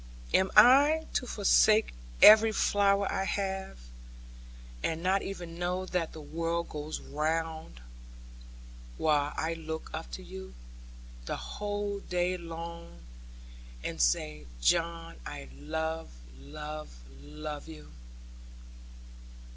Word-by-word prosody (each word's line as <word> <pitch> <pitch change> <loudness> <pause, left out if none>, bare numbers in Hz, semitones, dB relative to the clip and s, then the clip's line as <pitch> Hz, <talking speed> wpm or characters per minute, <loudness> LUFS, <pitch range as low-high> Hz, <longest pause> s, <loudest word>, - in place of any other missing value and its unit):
Am 190 0 +4
I 280 +8 +7
to 250 - -1
forsake 215 +1 +4 0.3
every 220 +1 +10
flower 200 -1 +2
I 190 - -1
have, 195 - -3 1.0
and 165 +1 -2
not 190 +2 +2
even 175 -3 -7
know 180 +1 -1
that 180 -3 -2
the 160 - -10
world 165 +2 -3
goes 150 +1 -5
round, 160 - -3 1.2
while 150 -2 +2
I 160 +1 -1
look 160 -1 -6
up - - -5
at - - -3
you, 65 0 -10 0.7
the - - -3
whole 205 -1 -4
day 180 -1 -1
long 170 - -8 0.8
and - - -3
say, 75 +4 +1
"John, 165 - 0
I 70 +2 -8
love, 160 - -4 0.3
love, 150 - -7 0.3
love 150 - -7
you?"' 155 - -11
165 Hz, 105 wpm, -30 LUFS, 150-195 Hz, 1.2 s, every